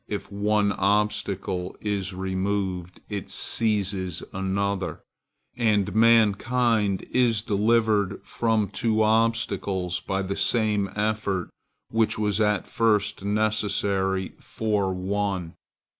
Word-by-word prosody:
_ - - -45
If 105 -1 -5
one 105 0 +1
obstacle 100 -2 -1
is 100 -2 -2
removed, 95 -1 -3
it 100 -3 -5
seizes 100 -5 0
another, 95 0 -2 0.5
and 105 -4 +1
mankind 115 -1 +3
is 115 -4 +2
delivered 105 -2 +2
from 110 -3 0
two 110 -1 +1
obstacles 110 -5 0
by 95 +2 -2
the 95 +1 -3
same 105 -4 +1
effort 105 -3 -1 0.4
which 115 -1 +1
was 105 0 0
at 105 -2 +1
first 105 -4 +1
necessary 100 -2 0
for 105 -3 -1
one. 95 -2 -2
100 Hz, 100 wpm, -25 LUFS, 95-110 Hz, 0.5 s, mankind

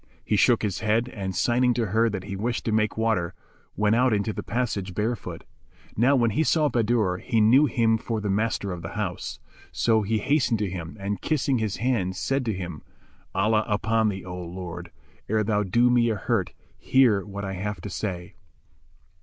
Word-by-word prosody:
He - - +1
shook 115 +3 +4
his 100 -4 -1
head 110 +3 +1
and, 95 -5 -5
signing 120 +5 +2
to 120 - 0
her 110 +3 +2
that 100 -3 -4
he 95 - -5
wished 115 +5 -2
to 115 - 0
make 110 0 +1
water, 110 -6 0 0.4
went 105 +1 +2
out 125 0 +3
into 105 +1 0
the - - -4
passage 100 -6 -2
barefoot. 115 +2 -3 0.5
Now 130 +6 +4
when 120 -3 +2
he 155 +10 +1
saw 155 -2 +2
Bahadur 115 -6 +1
he 115 +4 0
knew 125 +8 +6
him 115 -2 +2
for 115 0 -3
the 105 - -3
master 100 0 0
of 90 -1 -5
the 85 - -7
house; 95 -5 -3 0.3
so 110 -2 +2
he 110 +2 0
hastened 125 0 +1
to 105 -2 -1
him 85 +1 -6
and, 100 +1 -3
kissing 140 -4 +1
his 110 -3 -2
hands, 95 -6 -1
said 135 +5 0
to 110 - 0
him, 90 -5 -6 0.5
"Allah 110 +2 +2
upon 110 +1 +1
thee, 95 -2 -5
O 90 -1 -6
my 85 - -9
lord, 85 -2 -7 0.4
ere 110 0 +2
thou 105 0 +1
do 120 +5 +3
me 120 -1 +3
a 110 - 0
hurt, 105 -2 -1 0.3
hear 120 -7 +3
what 100 0 -6
I 95 - -4
have 105 +2 -4
to 100 - -6
say." 90 -3 -4
110 Hz, 200 wpm, -25 LUFS, 95-115 Hz, 0.5 s, knew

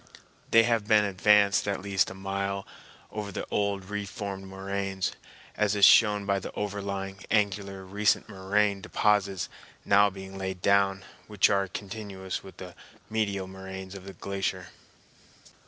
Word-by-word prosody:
They 115 0 +7
have 115 -3 +1
been 105 -2 +5
advanced 100 +1 +4
at 100 -1 -1
least 95 -1 +1
a 95 - -9
mile 100 0 -3 0.5
over 105 -2 -5
the - - -4
old 100 -2 0
re 105 +1 -3
formed 95 -1 -6
moraines, 95 0 -3 0.4
as 105 -1 +1
is 100 -1 +7
shown 105 -2 +6
by 100 0 +1
the - - -7
overlying, 100 -1 -4
angular, 100 -2 0
recent 100 +1 +1
moraine 100 0 0
deposits, 100 -2 +1 0.4
now 100 +1 +5
being 95 0 -9
laid 95 -1 -4
down, 100 +1 +2 0.2
which 105 -3 +3
are 100 -1 +2
continuous 95 -1 -6
with 95 - -13
the 90 -2 -9 0.4
medial 100 -3 0
moraines 95 0 -8
of 95 -1 -9
the 95 - -8
glacier. 95 -2 -3
100 Hz, 145 wpm, -28 LUFS, 95-105 Hz, 0.5 s, They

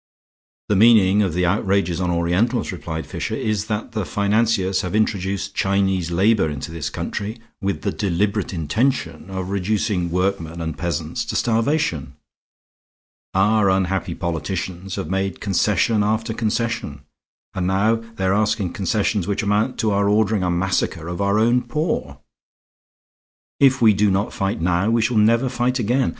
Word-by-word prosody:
"The 105 - +3
meaning 105 -2 +5
of 95 -5 0
the 90 0 +1
outrages 95 -2 +1
on 90 - 0
Orientals," 90 +9 0
replied 80 -3 -5
Fisher, 110 - -4
"is 110 -4 -2
that 105 +2 -3
the 110 -2 -2
financiers 100 -1 +1
have 90 +2 -4
introduced 100 -2 -1
Chinese 95 -3 +1
labor 95 0 +2
into 75 +2 -6
this 80 -4 -4
country 105 +3 -4 0.2
with 95 -6 -2
the - - 0
deliberate 100 +1 -1
intention 95 - -1
of 95 0 -4
reducing 100 -2 0
workmen 90 -2 -1
and 80 -2 -3
peasants 85 -3 -3
to - - -4
starvation. 115 - 0 1.2
Our 100 +1 +3
unhappy 95 -1 0
politicians 90 +2 -4
have 95 - -4
made 95 0 -1
concession 105 +2 +1
after 110 +2 0
concession; 110 - -2 0.5
and 90 -1 -2
now 105 +4 +2 0.2
they 95 - -2
are 95 - +3
asking 105 -2 0
concessions 100 0 0
which 100 +2 -1
amount 105 +5 +1
to 110 - +1
our 100 0 +2
ordering 105 -1 +2
a 90 - 0
massacre 90 -1 -1
of 90 +3 -4
our 100 +1 +2
own 120 +3 +3
poor. 120 - -2 1.4
If 130 -2 +4
we 110 -2 +7
do 105 +1 +2
not 100 +2 0
fight 100 +1 -2
now 90 +4 +1
we 115 -1 +2
shall 115 0 0
never 115 +4 +4
fight 125 0 0
again. 125 +2 +1
100 Hz, 155 wpm, -21 LUFS, 90-110 Hz, 1.4 s, we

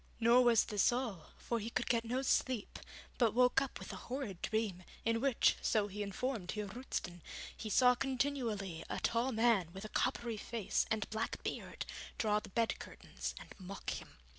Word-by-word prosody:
Nor 235 +2 +6
was 235 -2 +6
this 210 +1 +3
all, 240 -9 -2
for 235 - -2
he 220 +2 -4
could - - -1
get 235 -2 +2
no 250 +3 -1
sleep, 255 -4 +1 0.4
but 230 -3 +4
woke 250 +1 +5
up 275 - -3
with - - -7
a - - -9
horrid 245 -9 -3
dream, 215 -5 -1 0.2
in 230 0 +2
which, 275 -3 +4
so 215 -2 +2
he 205 +1 -5
informed 205 -1 -2
Heer 210 -1 -2
Roosten, 195 -5 -4 0.3
he 220 - -5
saw 250 +3 +6
continually 245 - -1
a - - -2
tall 235 +3 +1
man 225 -6 +3
with 195 +2 -7
a - - -6
coppery 240 -2 0
face 225 -1 -1
and 220 -2 0
black 220 +1 -2
beard - - -4 0.3
draw 210 -1 +2
the - - -11
bed 230 +3 +1
curtains - - -6
and - - -11
mock 190 +1 -5
him. - - -7
230 Hz, 185 wpm, -36 LUFS, 205-250 Hz, 0.4 s, Nor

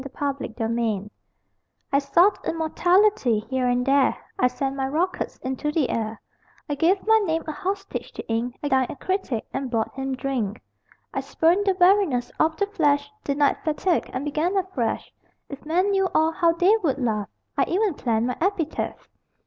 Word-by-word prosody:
THE 275 - -7
CRIB 230 -6 -2 0.8
I 280 - +5
sought 340 +8 +3
immortality 350 - +2
Here 260 -1 +1
and 245 0 +1
there 275 0 +3 0.2
I 250 - +5
sent 270 +2 -3
my 270 -1 -1
rockets 335 +7 -1
Into 265 +3 -2
the 300 -4 +1
air: 220 -1 -3 0.5
I 295 - -1
gave 340 +7 +2
my 445 0 +5
name 330 -6 -1
A 310 - -3
hostage 390 +5 -4
to - - -8
ink; 230 +2 -2
I 290 - 0
dined 260 -2 +2
a - - -5
critic 370 - -2
And 270 -1 -3
bought 225 -2 -1
him 270 0 -3
drink. 250 -6 -2 0.5
I - - -1
spurned 355 +5 +1
the 380 -1 +2
weariness 360 -9 +3
Of 315 0 +2
the 405 - +2
flesh; 290 -7 +1
Denied 285 0 +2
fatigue 325 +3 0
And 260 +3 -3
began 315 +6 0
afresh 360 -12 -2 0.4
If 280 -1 -8
men 365 +5 +2
knew 385 -1 +2
all, 315 +1 +4
How 335 0 +2
they 360 +5 +4
would 320 -11 0
laugh! 220 -6 -1 0.3
I - - +2
even 395 +1 +1
planned 230 -5 0
My 250 - -2
epitaph.... 350 -4 -2
290 Hz, 175 wpm, -24 LUFS, 255-360 Hz, 0.8 s, I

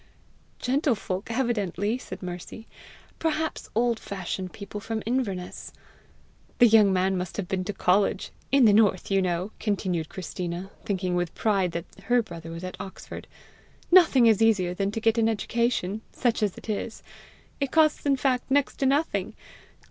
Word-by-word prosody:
"Gentlefolk 245 - -1
evidently," 225 -3 -1
said - - -9
Mercy, 180 +5 -7 0.3
" - - -25
perhaps 320 -1 -2
old 235 0 +2
fashioned 190 -1 -5
people 200 0 -7
from 220 +1 -4
Inverness." 210 -7 -3 0.9
"The 245 - +7
young 215 -3 +6
man 190 +1 +2
must 180 -1 -4
have 200 -4 -3
been 185 0 -1
to 205 - -2
college! 195 +2 +1 0.2
In 275 -3 +6
the 210 - +6
north, 205 -3 +3
you 195 0 +3
know," 180 +2 -1
continued 185 -6 -1
Christina, 180 +1 -5
thinking 185 -3 -1
with 175 -1 -1
pride 195 -5 +1
that 170 0 -3 0.2
her 245 0 +3
brother 165 -5 -9
was 165 +1 -7
at 185 - -6
Oxford, 190 - -9 0.6
"nothing 325 -9 +7
is 225 -2 +5
easier 200 -6 +3
than 195 +2 -1
to 215 - -3
get 225 +1 +2
an 225 0 +3
education, 220 -2 -1
such 235 -2 0
as 205 -3 0
it - - -11
is! 220 +1 -4 0.6
It 275 -2 0
costs 310 -2 +3
in 280 -1 +3
fact 255 -1 0
next 280 0 +2
to 270 - +1
nothing. 290 +4 0
210 Hz, 165 wpm, -26 LUFS, 185-240 Hz, 0.9 s, The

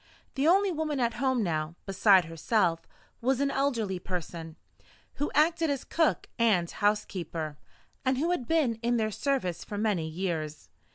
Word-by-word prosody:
The 275 +3 +1
only 390 +3 +4
woman 305 -3 -2
at 235 -2 +1
home 260 -4 +2
now, 155 -2 -2
beside 195 -2 +5
herself, 165 +1 0 0.3
was 260 +2 +1
an 280 0 +1
elderly 230 -10 0
person, 170 -3 -5 0.7
who 290 - +1
acted 325 +2 +3
as 280 -2 -1
cook 325 -2 +1
and 205 -7 +3
housekeeper, 175 -7 -2 0.4
and 260 0 +1
who 325 +6 +1
had 260 -10 -1
been 280 -9 +1
in 240 0 +1
their 215 -1 0
service 255 - -1
for 205 - -6
many 205 -7 0
years. 160 -3 -4
220 Hz, 155 wpm, -29 LUFS, 175-275 Hz, 0.7 s, beside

